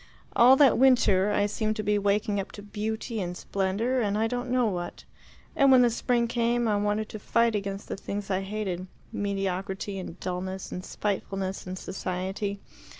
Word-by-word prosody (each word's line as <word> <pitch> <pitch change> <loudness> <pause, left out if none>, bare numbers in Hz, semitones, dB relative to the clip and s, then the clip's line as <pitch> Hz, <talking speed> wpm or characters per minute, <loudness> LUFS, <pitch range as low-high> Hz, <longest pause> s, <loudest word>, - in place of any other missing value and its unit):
All 250 +3 +8
that 270 -4 +5
winter 210 -7 +4
I 205 0 +2
seemed 215 +1 -1
to 215 - -3
be 210 0 +2
waking 205 0 +1
up 195 - -5
to 205 - -9
beauty 220 +2 -3
and 175 -1 -4
splendour 200 +9 0
and 205 -2 0
I 220 - +2
don't 245 +2 -2
know 250 -1 +2
what; 175 -5 -3 0.5
and 275 -1 +5
when 255 -1 +7
the 240 - +4
spring 235 +1 +1
came, 235 0 +1
I 210 - +2
wanted 210 +1 0
to 215 - -7
fight 230 +2 +2
against 200 -1 -3
the - - -4
things 200 0 -5
I 190 0 +1
hated 195 -2 -3 0.3
mediocrity 195 0 -2
and 185 -1 -8
dulness 185 +1 -4
and 180 - -5
spitefulness 195 -2 -3
and 185 +1 -5
society. 190 +2 -3
205 Hz, 180 wpm, -27 LUFS, 190-230 Hz, 0.5 s, All